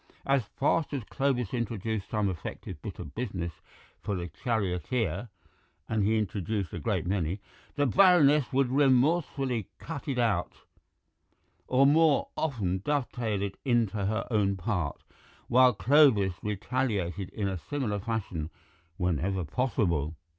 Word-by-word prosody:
As 135 -4 +2
fast 150 +2 +1
as 130 - -3
Clovis 130 -2 -1
introduced 110 -3 -2
some 105 -2 0
effective 85 -2 -6
bit - - -7
of 70 - -8
business 95 -8 -3 0.5
for 100 - -2
the 90 -1 -4
charioteer 105 - -1 0.6
(and 110 -2 0
he 110 +2 +2
introduced 100 -1 -2
a - - -4
great 75 - -1
many), 90 0 -1 0.4
the 145 - +2
Baroness 150 -5 +5
would 135 -2 +2
remorselessly 135 - +2
cut 160 -1 -7
it 135 -3 -1
out, 110 -8 +1 1.1
or 130 +2 +4
more 155 +1 +4
often 105 - -1
dovetail 120 -4 -1
it 100 -1 -5
into 120 -5 +1
her 110 +2 -1
own 100 -3 +2
part, 90 -5 -2 0.4
while 125 +1 +6
Clovis 115 -5 +4
retaliated 105 -3 -2
in 100 -2 -3
a 95 -2 -3
similar 130 -8 -1
fashion 95 -8 -3 0.5
whenever 90 +2 0
possible. 85 - 0
110 Hz, 130 wpm, -29 LUFS, 95-130 Hz, 1.1 s, while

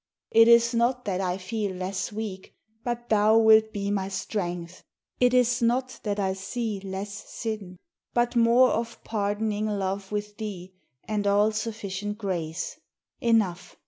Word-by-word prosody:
It 225 0 +7
is 235 0 +6
not 240 +2 +1
that 190 -2 -1
I 180 -1 -1
feel 200 0 -3
less 185 +1 -3
weak, 205 -3 -6 0.3
but 240 0 -3
thou 215 +1 +5
Wilt 220 -1 +6
be 200 -1 -2
my 195 -2 -1
strength; 180 -3 -4 0.4
it 250 0 +4
is 245 -1 +3
not 250 +2 0
that 205 -1 -2
I 190 -1 +1
see 210 +2 -3
Less 195 +1 -5 0.2
sin, 210 -5 -5 0.3
but 240 +1 +1
more 240 +2 +5
of 230 0 -3
pardoning 210 0 -1
love 195 -1 -2
with 210 0 -4
thee, 190 -4 -6 0.3
And 210 -1 -1
all 205 +2 +4
sufficient 210 -2 -4
grace. 175 -6 -3 0.4
Enough! 210 -8 +1
210 Hz, 145 wpm, -26 LUFS, 190-230 Hz, 0.4 s, It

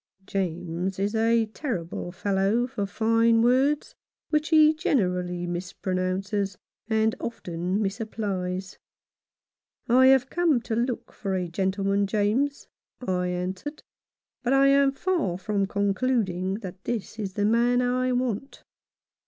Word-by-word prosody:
James 180 -1 -2
is 200 +2 -1
a 225 0 +3
terrible 205 - -4
fellow 195 +5 +1
for 225 -6 -3
fine 225 +2 +3
words, 270 +5 +2 0.4
which 305 0 +1
he 310 -1 +6
generally 180 - 0
mispronounces 185 +2 -2 0.3
and 220 0 +2
often 180 -3 -3
misapplies. 195 -3 -3 0.6
" - - -68 0.2
I 255 +2 +6
have 265 0 +5
come 335 -7 +2
to 225 -1 -3
look 240 +1 -2
for 195 -2 -3
a 180 -1 -1
gentleman, 195 +3 0
James," 220 +8 0 0.3
I 180 -6 -1
answered, 185 - -4 0.6
"but 255 +1 +1
I 275 0 +5
am 275 0 +5
far 295 - -1
from 200 +1 -1
concluding 200 -2 0
that 190 -1 -8
this 225 -1 -4
is 195 -3 -3
the 205 +1 0
man 235 +3 +3
I 250 +1 +1
want." 250 +1 -2
210 Hz, 125 wpm, -26 LUFS, 185-250 Hz, 0.6 s, he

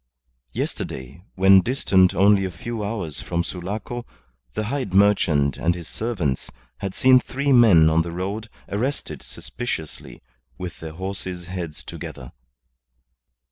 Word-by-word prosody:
Yesterday, 65 +4 -5
when 95 0 +7
distant 95 -6 +3
only 100 +2 +5
a 95 - -1
few 115 +4 -5
hours 100 -9 -3
from 85 0 -1
Sulaco, 105 +8 -5 0.5
the 110 - -1
hide 130 -2 -3
merchant 85 -9 +4
and 85 +1 +1
his 85 -2 -8
servants 95 - -2 0.3
had 95 -1 -4
seen 130 0 +6
three 140 +2 -1
men 105 -11 +7
on 80 +1 +4
the 85 +1 -4
road 100 +5 -4 0.2
arrested 105 - -3
suspiciously, 115 -11 -6 0.3
with 90 -2 -6
their 80 -1 -7
horses' 95 0 -5
heads 85 -4 -6
together. 65 -1 -8
95 Hz, 130 wpm, -23 LUFS, 85-110 Hz, 0.5 s, when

